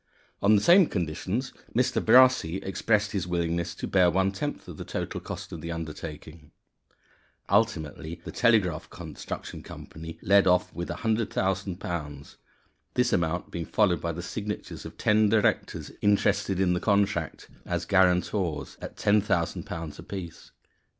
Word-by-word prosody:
On 105 +2 +5
the 100 - +2
same 175 0 +7
conditions, 90 - -3 0.2
Mr. 125 +1 +1
Brassey 125 -7 +5
expressed 105 +2 +1
his 95 -3 -2
willingness 85 -1 -1
to - - -5
bear 90 -2 +4
one 95 +3 +2
tenth 145 +10 -5
of - - -9
the - - -6
total - - -4
cost - - -7
of - - -7
the 85 - -5
undertaking. 80 -1 -7 1.0
Ultimately, 85 -6 0
the - - -7
Telegraph 105 -9 +2
Construction - - -7
Company 80 +1 -9
led 100 0 +5
off 90 0 +3
with 85 0 -5
£100,000, 95 -9 -2 0.6
this 125 -1 +2
amount 85 -1 0
being 85 -2 -4
followed 90 -7 +2
by 85 - -1
the 85 +1 -6
signatures 105 +3 -5
of - - -13
ten 105 0 +3
directors 110 0 +1
interested 100 -1 +2
in 90 -2 +3
the 90 - 0
contract 100 -6 0 0.2
(as 85 -1 -2
guarantors) 90 -2 +1
at - - -8
£10,000 90 -5 0
apiece. 90 -4 -8
95 Hz, 135 wpm, -27 LUFS, 85-105 Hz, 1.0 s, same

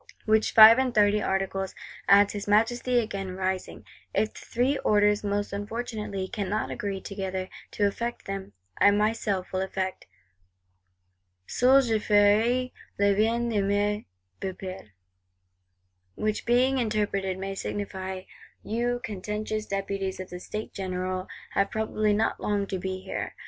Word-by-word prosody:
Which 220 0 +2
Five 225 +2 +10
and 255 -2 0
Thirty 210 0 +4
Articles, 195 0 -1 0.3
adds 200 0 +6
his 205 -1 -5
Majesty 240 +4 +2
again 195 -5 -2
rising, 190 0 -3 0.3
if 220 - +1
the - - -11
Three 255 +4 0
Orders 210 0 +3
most 205 0 -1
unfortunately 210 -2 -4
cannot 210 -1 -2
agree 200 -2 -3
together 190 -1 -4 0.2
to 205 - +1
effect 235 +4 -2
them, 195 0 -5 0.3
I 200 - +7
myself 205 -2 0
will 185 - 0
effect: 190 0 -3 1.4
'seul 265 - +4
je 225 -3 +1
ferai 215 +5 +3 0.3
le 200 0 +4
bien 225 +4 +1
de 210 -3 +1
mes 205 +1 0 0.3
peuples,'—which 90 - -8
being 255 +3 +3
interpreted 205 -4 -1
may 195 +1 -4
signify, 190 -1 -4 0.4
You, 240 +2 -1
contentious 215 +1 -4
Deputies 195 -1 -3
of 185 - -7
the 180 - -6
States 215 +4 -6
General, 185 -1 -3 0.2
have 200 0 +1
probably 215 -1 0
not 220 +2 0
long 205 -1 0
to 195 -1 -4
be 185 0 -4
here! - - -5
205 Hz, 135 wpm, -27 LUFS, 190-215 Hz, 1.4 s, Five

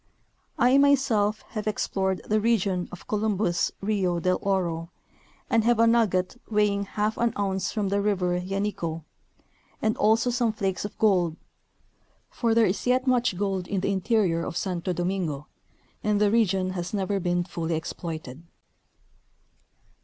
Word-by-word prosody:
I 255 +3 +5
myself 240 -7 +3
have 215 -2 -5
explored 190 -2 -1
the 215 +1 +2
region 200 -5 +1
of 180 - -10
Columbus' 205 -5 0
Rio 195 -4 0
del 185 +1 +1
Oro 170 -4 -1 0.6
and 225 -1 +2
have 240 0 +3
a 230 - +5
nugget 225 -2 +2
weighing 210 -2 +1
half 210 +2 -2
an 235 -1 +1
ounce 195 -1 -1
from 210 -3 -1
the 200 +1 +1
river 180 -3 0
Yanico, 180 -4 -3 0.8
and 220 0 +1
also 225 +3 +3
some 240 -2 +1
flakes 195 -3 -2
of 205 - -7
gold; 180 -6 +2 0.9
for 230 -2 0
there 230 -1 +5
is 185 - 0
j^et 255 +1 +1
much 245 -7 +2
gold 190 -2 -1
in 195 -2 -1
the 200 - 0
interior 190 -4 +1
of - - -4
Santo 180 -1 -2
Domingo 175 -5 -2 0.6
and 210 -1 +1
the 205 -1 +3
region 195 -5 +2
has 180 +1 -4
never 200 0 -1
been 175 -1 0
fully 170 -2 -3
exploited. 160 -3 -6
200 Hz, 145 wpm, -26 LUFS, 180-220 Hz, 0.9 s, I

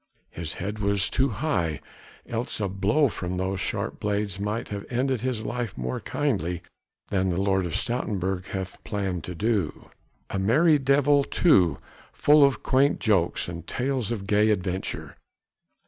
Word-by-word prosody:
His 80 -2 -5
head 105 +4 -4
was 100 -1 +2
too 135 +1 +2
high, 90 - -1 0.5
else 115 0 -3
a 100 - 0
blow 100 +10 +2
from 90 -6 -4
those 95 +1 -1
sharp - - -3
blades 100 -2 -1
might 105 +3 -2
have 100 -1 -4
ended 130 -1 0
his 120 -4 -2
life 120 -3 -3
more 65 0 -3
kindly 90 - -1 0.5
than 95 -1 +1
the 90 0 0
Lord 95 -2 +1
of 80 - -6
Stoutenburg 95 -6 -1
hath 95 -2 -6
planned 95 -5 -2
to 90 - -6
do. 100 -5 -1 0.4
A 95 - -1
merry 150 - +4
devil 140 +1 +4
too! 100 - +3 0.4
full 150 0 +5
of 140 -1 +2
quaint 135 +2 +3
jokes 100 -7 +1
and 85 -1 -7
tales 130 -3 -1
of 105 -4 -3
gay 105 +2 +3
adventure! 95 -2 -2
100 Hz, 155 wpm, -26 LUFS, 95-125 Hz, 0.5 s, full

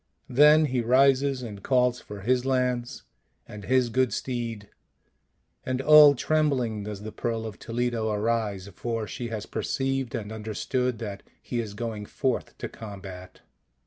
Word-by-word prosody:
Then 150 +4 +6
he 130 -3 0
rises 135 +2 +3
and 105 -4 -7
calls 125 0 +2
for 105 -1 -9
his 125 +4 +1
lance 125 -2 -1 0.4
and 105 -1 -9
his 130 -1 +2
good 130 +1 +1
steed, 115 -5 -4 1.0
and 130 0 -2
all 150 0 +8
trem 155 +3 +2
bling 115 -7 -2
does 105 -1 -6
the 110 - -6
Pearl 115 0 -3
of 110 -3 -7
Toledo 115 -1 -1
arise, 105 -3 -1
for 115 0 -3
she 120 +3 -5
has 110 -3 -5
perceived 135 -2 -2
and 105 -1 -5
understood 110 +3 -2
that 105 -3 -6 0.2
he 120 - -4
is 105 -3 -4
going 110 -2 -5
forth 130 -3 -2
to - - -4
combat. 95 -4 -10
120 Hz, 150 wpm, -26 LUFS, 105-130 Hz, 1.0 s, all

